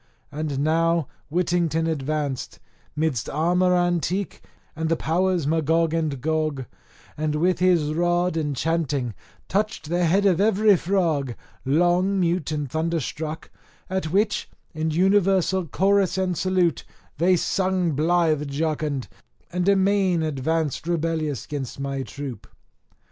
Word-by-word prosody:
And 145 -2 -3
now 165 0 +2 0.2
Whittington 170 -1 +1
advanced, 150 -3 -2 0.4
'midst 150 -7 -1
armour 180 +4 +2
antique 175 +2 0 0.3
and 160 0 -2
the 165 - +3
powers 175 +1 0
Magog 160 +1 +1
and 155 -5 -1
Gog, 155 -2 -1 0.5
and 155 0 -1
with 175 +4 +1
his 175 -5 +3
rod 175 +1 +1
enchanting 145 -4 -1 0.3
touched 205 -6 -2
the 175 +1 +1
head 195 +5 +3
of 190 -2 +3
every 210 0 +4
frog, 165 -9 0 0.3
long 175 +7 +2
mute 170 -3 0
and 150 -2 -2
thunderstruck, 160 +1 -3 0.4
at 190 -4 -1
which, 205 +5 0 0.2
in 155 0 -1
universal 190 +1 +2
chorus 195 +3 +2
and 185 -1 0
salute, 180 -1 +1 0.4
they 180 +2 +4
sung 185 0 0
blithe 155 0 +1
jocund, 150 -2 -2 0.4
and 180 +2 +1
amain 195 -3 +3
advanced 155 +1 -1
rebellious 160 -5 -1
'gainst 140 -3 -5
my 140 0 -3
troop. 135 -2 -7
165 Hz, 120 wpm, -24 LUFS, 150-180 Hz, 0.5 s, every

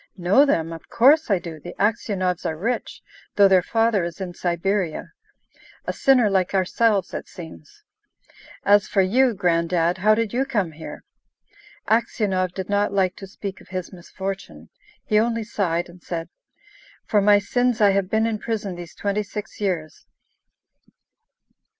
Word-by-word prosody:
"Know 195 +11 +4
them? 165 - 0
Of 165 - -11
course 285 +6 +4
I 200 - +3
do. 170 -3 -8
The 175 +4 -9
Aksionovs 200 -4 0
are 160 - -2
rich, 230 +8 -3 0.3
though 200 -1 +7
their 190 -1 +5
father 225 0 +1
is 170 +3 -5
in 185 -2 -5
Siberia: 175 0 -2 0.7
a - - -2
sinner 255 -5 +4
like 190 -1 +1
ourselves, 195 +1 +1
it - - -5
seems! 160 - -12 0.8
As 205 +1 +5
for 195 - +2
you, 240 +5 +3
Gran'dad, 170 0 +1
how 215 +3 +4
did 225 -1 -1
you 255 +2 +1
come 210 -11 -1
here?" 160 +1 -9 0.8
Aksionov 195 -5 0
did 190 -1 -4
not 205 0 +1
like 190 -2 +1
to 195 - -9
speak 195 0 -7
of - - -17
his 185 0 -5
misfortune. 190 +2 -7 0.4
He 210 -1 +3
only 230 0 0
sighed, 175 -6 -1
and 175 0 -15
said, 165 -1 -5 0.8
"For 210 - +2
my 205 +1 +6
sins 245 +4 0
I 205 -2 +5
have 195 -1 0
been 220 +1 +2
in 225 -2 -1
prison 215 -4 -3
these 175 -1 -10
twenty 205 +1 -1
six 210 +1 -8
years." 170 -6 -3
195 Hz, 155 wpm, -23 LUFS, 175-215 Hz, 0.8 s, though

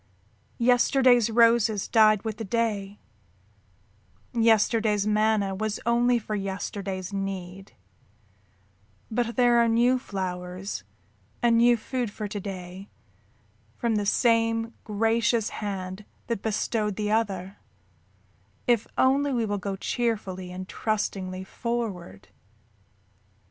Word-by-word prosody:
Yesterday's 245 0 +4
roses 230 -2 +3
died 215 -3 +4
with 220 -2 -4
the 225 - -5
day, 205 -2 -2 1.4
yesterday's 220 -2 +3
manna 215 -2 +2
was 215 +2 -3
only 240 +1 +3
for 215 -1 -5
yesterday's 195 -1 -4
need, 195 -1 -5 1.4
but 235 +1 -1
there 245 -2 +4
are 235 - +4
new 240 +3 +3
flowers 185 -3 -5 0.6
and 235 -1 +4
new 240 0 +5
food 245 0 -3
for 210 +1 -5
to 205 0 -5
day 185 0 -8 0.9
from 235 -2 -1
the 205 -1 0
same 230 0 +2
gracious 225 +1 +1
hand 195 -1 -5 0.2
that 230 -4 -3
bestowed 215 -1 -1
the 210 0 -2
other, 195 -4 -1 1.1
if 235 -3 +2
only 275 +2 +3
we 235 -3 0
will 205 -1 -2
go 195 +1 -3
cheerfully 190 -4 -2
and 185 +1 -7
trustingly 190 -4 -3
forward. 190 - -5
215 Hz, 105 wpm, -26 LUFS, 195-235 Hz, 1.4 s, new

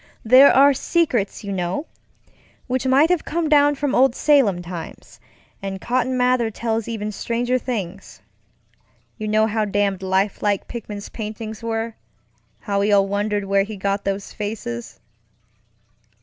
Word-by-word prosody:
There 255 +5 +8
are 280 +2 +6
secrets, 255 - 0
you 200 - -5
know, 185 - -2 0.8
which 260 +1 -1
might 280 +6 +4
have 355 -3 +1
come 335 0 -2
down 290 -1 +4
from 285 -1 -2
old 260 -1 +4
Salem 235 -12 +3
times, 175 -1 -9 0.4
and 195 -1 -5
Cotton 255 +3 -1
Mather 250 -2 +2
tells 225 0 -3
even 215 -2 -4
stranger 240 +4 -1
things. 195 -7 -5 1.0
You 215 - -3
know 215 +1 +3
how 220 0 0
damned 200 -2 0
lifelike 195 +1 0
Pickman's 210 -3 -7
paintings 220 -1 -7
wereŌĆöhow 225 0 -3 0.9
we 205 +1 +1
all 200 -1 +4
wondered 205 0 -1
where 195 0 +2
he 205 +1 -5
got 200 +1 -1
those 195 0 -3
faces. 205 - -6
215 Hz, 135 wpm, -21 LUFS, 200-255 Hz, 1.0 s, There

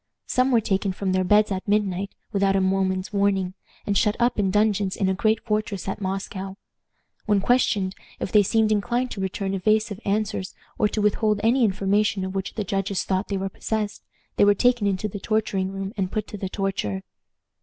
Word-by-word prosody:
Some 255 +1 +2
were 235 -3 +4
taken 195 -2 0
from 190 0 -2
their 185 0 +2
beds 210 +3 +4
at 190 +1 -3
midnight, 200 -2 0 0.2
without 195 -1 +2
a - - +3
moment's 190 0 0
warning, 195 -2 +1 0.3
and 200 - 0
shut 210 +2 +3
up 240 -2 +2
in 195 -2 +2
dungeons 205 -1 +1
in 195 - 0
a 190 - +2
great 215 +3 +2
fortress 210 -4 -2
at 195 - -3
Moscow. 195 0 -4 0.7
When 205 -1 +3
questioned, 200 -4 +2 0.3
if - - -3
they 210 - +6
seemed 220 +2 +2
inclined 240 +4 0
to 195 - -5
return 190 +1 -2
evasive 215 +2 +1
answers, 200 -2 -1 0.2
or 210 - +4
to 210 0 -2
withhold 210 0 +2
any 240 +3 +4
information 200 0 +1
of 190 - -5
which 195 -1 -4
the 215 - -1
judges 195 -1 -1
thought 190 +1 -1
they 200 - -2
were 190 0 -2
possessed, 210 +2 -3 0.4
they - - +5
were 205 0 +5
taken 240 -1 +2
into 195 +1 0
the 205 0 -6
torturing 195 -3 -1
room 195 +1 -5
and 190 -2 -2
put 215 -2 -2
to 210 - -6
the 190 - -3
torture. 185 - -2
200 Hz, 195 wpm, -24 LUFS, 190-215 Hz, 0.7 s, they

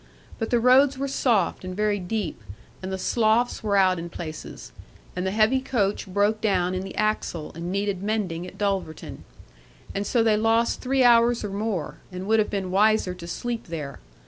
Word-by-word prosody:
But 225 - -2
the 240 - +3
roads 260 +3 +5
were 275 +1 -2
soft 230 -11 +1
and 185 0 -6
very 210 -1 +1
deep, 185 - -3 0.4
and 190 0 -5
the 190 - -2
sloughs 225 +4 +1
were 205 -2 +1
out 185 -2 +4
in 170 +1 -6
places; 155 - -8 0.4
and 180 +1 -2
the - - +1
heavy 215 +6 +3
coach 210 -7 -1
broke 205 +3 +1
down 185 -4 +1
in 185 - -2
the 195 0 -7
axle, 215 -7 -1
and 170 +2 -5
needed 200 -1 -1
mending 195 -5 -2
at - - -12
Dulverton; 195 -6 -3 0.7
and 200 +1 -2
so 235 -3 +2
they 220 -2 +3
lost 225 +2 +2
three 265 0 +2
hours 235 -1 +5
or 205 - -4
more, 200 -5 -3
and 180 +1 -6
would 220 +2 +3
have 210 - +1
been 190 -2 -3
wiser 210 -1 +3
to 175 -1 -10
sleep 235 +6 -4
there. 150 -5 -6
205 Hz, 190 wpm, -25 LUFS, 185-225 Hz, 0.7 s, roads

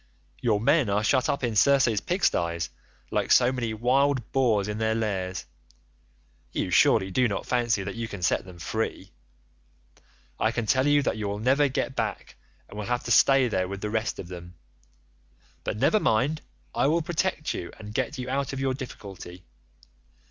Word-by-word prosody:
Your 110 -4 +2
men 135 +1 +3
are 100 +2 +1
shut 130 +3 +2
up 140 - -1
in 115 -3 -1
Circe's 120 -3 +4
pigstyes, 85 - 0 0.4
like - - 0
so 125 0 +6
many 120 -3 -2
wild 130 +2 +1
boars 115 -7 +2
in 105 +1 -4
their 110 0 +1
lairs. 95 -5 -2 1.1
You - - -2
surely 95 0 +4
do 125 +6 +3
not 100 -3 -3
fancy 120 -5 +1
that 100 0 -5
you 115 +1 -4
can 100 -5 -8
set 85 - +2
them 90 -2 -12
free? 95 +2 -4 1.3
I 110 - +2
can 115 -1 -2
tell 130 +5 +2
you 145 -1 +4
that - - -1
you 105 -1 -3
will 100 0 -3
never 135 +6 +3
get 135 0 -2
back - - -3 0.3
and 105 - -9
will 105 - -4
have 125 0 -1
to - - -4
stay 135 -2 +5
there 95 -5 -1
with 100 +1 -6
the 105 - -3
rest 110 0 -1
of 85 - -7
them. 90 0 -10 1.1
But - - -3
never 215 - +3
mind, 140 - +1 0.3
I - - +2
will 165 +2 +2
protect 175 -1 -1
you 85 - -6
and 105 -1 -9
get 130 +2 -2
you 125 0 -5
out 135 +1 -2
of 135 - -4
your 135 -1 0
difficulty. 95 -8 -9
115 Hz, 185 wpm, -26 LUFS, 100-135 Hz, 1.3 s, so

